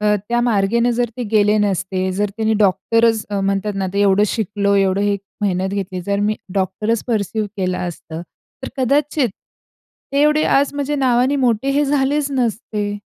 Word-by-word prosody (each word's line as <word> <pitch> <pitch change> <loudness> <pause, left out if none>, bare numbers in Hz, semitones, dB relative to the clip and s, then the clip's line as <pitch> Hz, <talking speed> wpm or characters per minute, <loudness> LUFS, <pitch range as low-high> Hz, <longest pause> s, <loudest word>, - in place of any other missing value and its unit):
अ, 210 0 +3
त्या 240 0 +1
मार्गेनं 235 +1 +2
जर 240 -2 +1
ते 250 - -3
गेले 210 0 +4
नसते. 190 -2 0
जर 205 +2 -1
त्यांनी 220 0 +1
डॉक्टरच, 225 +2 +2 0.2
म्हणतात 195 +1 -1
ना, 195 -1 -1
ते 200 - 0
एवढं 200 0 +4
शिकलो 205 -1 0
एवढं 195 0 +2
हे, 205 0 +1 0.3
मेहनत 190 -1 0
घेतली. 190 -2 -3
तर 200 0 0
मी 210 +1 +1 0.2
डॉक्टरच 205 +4 -1
पर्सिव्ह 220 -2 -1
केलं 185 -2 -1
असतं, 170 -1 -6 0.4
तर - - -4
कदाचित, 280 +1 +1 0.8
ते 280 - +2
एवढे 300 +1 +3
आज 280 +1 +2
म्हणजे 285 +1 -2
नावाने 260 +1 +2
मोठे 250 0 +1
हे 285 +2 +2
झालेच 285 +1 +1
नसते. 215 -5 -2
210 Hz, 165 wpm, -19 LUFS, 195-250 Hz, 0.8 s, गेले